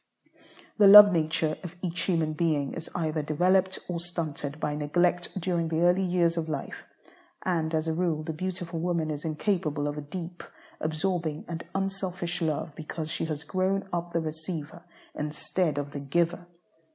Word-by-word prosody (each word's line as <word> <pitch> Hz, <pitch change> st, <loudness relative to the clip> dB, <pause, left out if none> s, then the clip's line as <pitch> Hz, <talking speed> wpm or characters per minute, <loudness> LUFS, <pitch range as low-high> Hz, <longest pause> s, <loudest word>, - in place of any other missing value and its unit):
The 205 Hz, -, +8 dB
love 205 Hz, +1 st, +12 dB
nature 155 Hz, -2 st, +1 dB
of 175 Hz, -1 st, -7 dB
each 175 Hz, -1 st, -2 dB
human 165 Hz, -4 st, +1 dB
being 150 Hz, -3 st, 0 dB
is 165 Hz, -, -6 dB
either 160 Hz, -2 st, 0 dB
developed 185 Hz, +5 st, +2 dB
or 175 Hz, -2 st, -2 dB
stunted 155 Hz, -4 st, -4 dB
by 150 Hz, -1 st, -1 dB
neglect 175 Hz, +5 st, +1 dB
during 170 Hz, -2 st, 0 dB
the 160 Hz, +1 st, 0 dB
early 175 Hz, +2 st, +4 dB
years 175 Hz, -2 st, +2 dB
of 160 Hz, -1 st, -2 dB
life, -, -, -5 dB, 0.6 s
and, 165 Hz, -3 st, 0 dB
as 155 Hz, +1 st, 0 dB
a 160 Hz, -, +1 dB
rule, 165 Hz, -2 st, 0 dB
the 160 Hz, 0 st, -4 dB
beautiful 175 Hz, 0 st, -4 dB
woman 170 Hz, -2 st, 0 dB
is 150 Hz, -1 st, -5 dB
incapable 155 Hz, -3 st, -1 dB
of 145 Hz, +1 st, -3 dB
a -, -, -4 dB
deep, 170 Hz, +3 st, -7 dB, 0.4 s
absorbing, 155 Hz, -1 st, -1 dB
and 170 Hz, -1 st, -5 dB
unselfish 190 Hz, -3 st, -2 dB
love, 155 Hz, -1 st, -1 dB
because 155 Hz, 0 st, -5 dB
she -, -, -1 dB
has 155 Hz, -1 st, -4 dB
grown 190 Hz, +3 st, 0 dB
up 175 Hz, 0 st, -2 dB
the 170 Hz, -1 st, 0 dB
receiver 160 Hz, +1 st, -5 dB, 0.3 s
instead 150 Hz, +1 st, -1 dB
of 145 Hz, 0 st, -3 dB
the 145 Hz, -, -5 dB
giver. 170 Hz, +5 st, 0 dB
165 Hz, 165 wpm, -28 LUFS, 155-180 Hz, 0.6 s, love